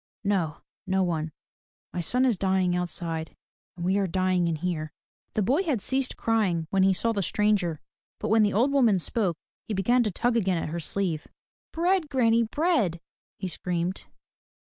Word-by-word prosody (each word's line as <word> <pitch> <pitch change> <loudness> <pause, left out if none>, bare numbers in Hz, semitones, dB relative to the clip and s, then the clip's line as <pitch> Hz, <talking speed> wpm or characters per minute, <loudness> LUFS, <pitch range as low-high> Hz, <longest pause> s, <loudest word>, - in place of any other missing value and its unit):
" - - -76
No, 185 -6 0 0.3
no 190 0 +2
one. 160 -3 -1 0.6
My 175 - -2
son 250 +10 +2
is 245 -4 +3
dying 190 -1 +1
outside 170 -2 -3 0.4
and 170 - -4
we 190 +2 +2
are 195 - +1
dying 185 0 +1
in 165 - 0
here." 155 -2 -3 0.4
The 215 - +1
boy 270 - +2
had 305 - 0
ceased 265 +5 -1
crying 200 -8 +1
when 195 - +3
he 190 +1 +5
saw 230 +5 0
the 205 -3 -1
stranger; 195 -4 +1 0.4
but 215 - -3
when 220 +1 +5
the 205 -1 +3
old 245 +8 +2
woman 240 -8 +4
spoke 180 -1 -1 0.3
he 215 - -2
began 240 +7 +3
to 220 - +1
tug 235 +5 0
again 190 -6 +2
at 165 - -3
her 170 +2 -3
sleeve. 170 -1 -2 0.4
"Bread, 345 -1 +1
granny, 235 -4 +3
bread!" 230 - +1 0.4
he 190 - -4
screamed. 180 +1 -3
195 Hz, 180 wpm, -27 LUFS, 175-230 Hz, 0.6 s, he